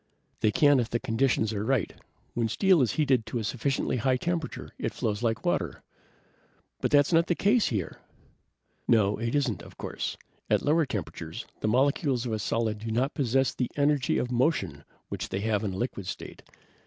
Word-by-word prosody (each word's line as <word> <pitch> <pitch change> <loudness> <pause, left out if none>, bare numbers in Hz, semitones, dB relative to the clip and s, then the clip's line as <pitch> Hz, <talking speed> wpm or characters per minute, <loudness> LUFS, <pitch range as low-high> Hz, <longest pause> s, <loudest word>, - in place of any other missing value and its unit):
"They 110 - +3
can 145 +5 +5
if 115 - -1
the 120 - 0
conditions 115 -2 +1
are 105 -1 -2
right. 120 -4 0 0.4
When 115 -1 0
steel 185 - +4
is 120 - +2
heated 135 -6 +2
to - - -3
a 115 - -2
sufficiently 130 +4 -1
high 130 +1 +2
temperature, 165 +2 -3
it - - -3
flows 105 -1 -1
like 115 -2 -1
water." - - -1 1.0
"But - - 0
that's 145 +3 +4
not 165 +1 +4
the 175 - +1
case 215 +5 +3
here!" 100 -8 -3 0.9
"No, 105 -3 +3
it 115 +4 -2
isn't, 135 -7 0
of - - -13
course. - - -4 0.3
At - - +2
lower 155 0 +3
temperatures 105 - -5
the - - -1
molecules 130 +1 +2
of 120 - -2
a 110 - -1
solid 110 +1 -1
do 115 +2 -5
not 125 +6 0
possess 135 -1 +1
the 125 - -2
energy 145 -1 +2
of 125 - -1
motion 120 - 0 0.2
which - - -4
they 95 - -2
have 110 0 0
in 100 -3 -2
a - - -5
liquid 100 -4 -3
state. - - -7
120 Hz, 190 wpm, -28 LUFS, 110-145 Hz, 1.0 s, can